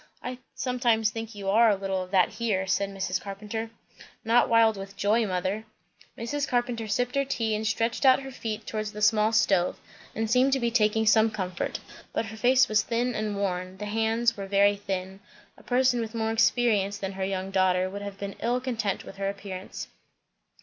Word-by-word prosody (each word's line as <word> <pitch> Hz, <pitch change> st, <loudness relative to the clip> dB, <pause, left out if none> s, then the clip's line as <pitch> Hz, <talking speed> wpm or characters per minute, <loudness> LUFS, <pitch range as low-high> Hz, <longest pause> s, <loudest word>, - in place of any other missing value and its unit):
"I 250 Hz, 0 st, -5 dB, 0.2 s
sometimes 235 Hz, -4 st, +1 dB
think 225 Hz, 0 st, -6 dB
you 200 Hz, -1 st, -6 dB
are 225 Hz, +2 st, +6 dB
a 205 Hz, -, +3 dB
little 195 Hz, -1 st, -2 dB
of 185 Hz, -, -7 dB
that 185 Hz, -2 st, +3 dB
here," 210 Hz, -5 st, -1 dB
said 195 Hz, +1 st, 0 dB
Mrs. 190 Hz, -2 st, -2 dB
Carpenter. 210 Hz, +3 st, -5 dB, 0.6 s
"Not 230 Hz, +2 st, +4 dB
wild 225 Hz, -1 st, +5 dB
with 195 Hz, 0 st, -9 dB
joy, 215 Hz, +2 st, +2 dB
mother." 185 Hz, +3 st, -2 dB, 0.5 s
Mrs. 285 Hz, +5 st, -2 dB
Carpenter 240 Hz, -2 st, -1 dB
sipped 245 Hz, +4 st, 0 dB
her 275 Hz, -, +2 dB
tea, 230 Hz, -5 st, -1 dB
and 215 Hz, +1 st, -1 dB
stretched 230 Hz, +3 st, 0 dB
out 265 Hz, 0 st, +6 dB
her 270 Hz, -, -7 dB
feet 220 Hz, -4 st, -5 dB
towards 215 Hz, -1 st, -4 dB
the 210 Hz, -, -7 dB
small 215 Hz, +1 st, +4 dB
stove, 195 Hz, -5 st, +2 dB, 0.4 s
and 225 Hz, 0 st, -1 dB
seemed 255 Hz, +4 st, +3 dB
to 270 Hz, -, +2 dB
be 235 Hz, -1 st, 0 dB
taking 220 Hz, -1 st, +2 dB
some 220 Hz, +1 st, +5 dB
comfort. 185 Hz, -5 st, -3 dB, 0.3 s
But -, -, -1 dB
her 220 Hz, 0 st, -8 dB
face 255 Hz, +3 st, +4 dB
was 215 Hz, -2 st, +3 dB
thin 240 Hz, +1 st, -1 dB
and 215 Hz, -1 st, -2 dB
worn, 185 Hz, -2 st, -3 dB
the 210 Hz, -, -5 dB
hands 225 Hz, +2 st, +1 dB
were 195 Hz, -1 st, -6 dB
very 200 Hz, +1 st, +4 dB
thin; 190 Hz, -1 st, -4 dB, 0.4 s
a -, -, -18 dB
person 250 Hz, 0 st, +2 dB
with 225 Hz, 0 st, -5 dB
more 220 Hz, -1 st, 0 dB
experience 220 Hz, -3 st, +2 dB
than 195 Hz, -1 st, -4 dB
her 190 Hz, 0 st, -4 dB
young 190 Hz, 0 st, -3 dB
daughter 185 Hz, -1 st, +2 dB
would 200 Hz, +2 st, -6 dB
have 200 Hz, -1 st, -7 dB
been 200 Hz, 0 st, -6 dB
ill 240 Hz, +2 st, +1 dB
content 230 Hz, -6 st, -2 dB
with 195 Hz, -, -11 dB
her 195 Hz, 0 st, -1 dB
appearance. 195 Hz, -1 st, -7 dB
215 Hz, 200 wpm, -27 LUFS, 195-230 Hz, 0.6 s, are